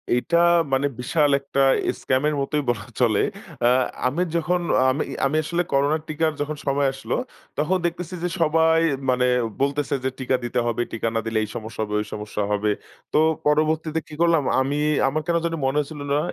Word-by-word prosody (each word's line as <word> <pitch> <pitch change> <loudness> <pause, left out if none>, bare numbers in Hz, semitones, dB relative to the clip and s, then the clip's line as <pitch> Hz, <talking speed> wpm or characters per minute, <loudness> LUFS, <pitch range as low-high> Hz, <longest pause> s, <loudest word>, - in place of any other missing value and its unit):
এইটা 165 +7 +1 0.4
মানে 135 +2 +2
বিশাল 145 +4 +2
একটা 140 0 -1 0.4
স্কাম 130 0 +1
এর 150 - 0
মতোই 150 +2 -1
বলা 110 -3 -1 0.2
চলে। 110 -4 +3 0.5
আ - - +6 0.4
আমি 145 +8 -1
যখন 170 +2 +1 0.3
আমি 140 +4 -1 0.2
আমি 145 +3 +1
আসলে 170 +3 0
করোনার 145 +3 +2
টিকার 155 +1 0
যখন 150 +1 -2
সময় 140 0 +2
আসলো 135 - -3 0.4
তখন 165 +6 +1
দেখতেছি 170 +1 -3
যে 180 - 0
সবাই 160 +1 +4 0.3
মানে 125 0 +3 0.4
বলতেছে 140 +1 0
যে, 130 - +1
"টিকা 130 0 +1
দিতে 120 +1 -1
হবে, 120 0 0
টিকা 115 0 -2
না - - +2
দিলে 115 0 -1
এই 105 - -5
সমস্যা 110 -1 -5
হবে, 105 0 -3
ঐ - - -1
সমস্যা 105 0 -3
হবে।" 105 +1 +1 0.4
তো - - +4 0.3
পরবর্তীতে 155 +1 +1
কি - - -12
করলাম 170 -3 +4 0.2
আমি 140 +2 -1 0.3
আমার 150 +3 0
কেন 170 - +1
জানি 165 -1 -1
মনে 135 +2 0
হচ্ছিল 150 +1 -8
না। 145 - +3
145 Hz, 185 wpm, -23 LUFS, 125-160 Hz, 0.5 s, আ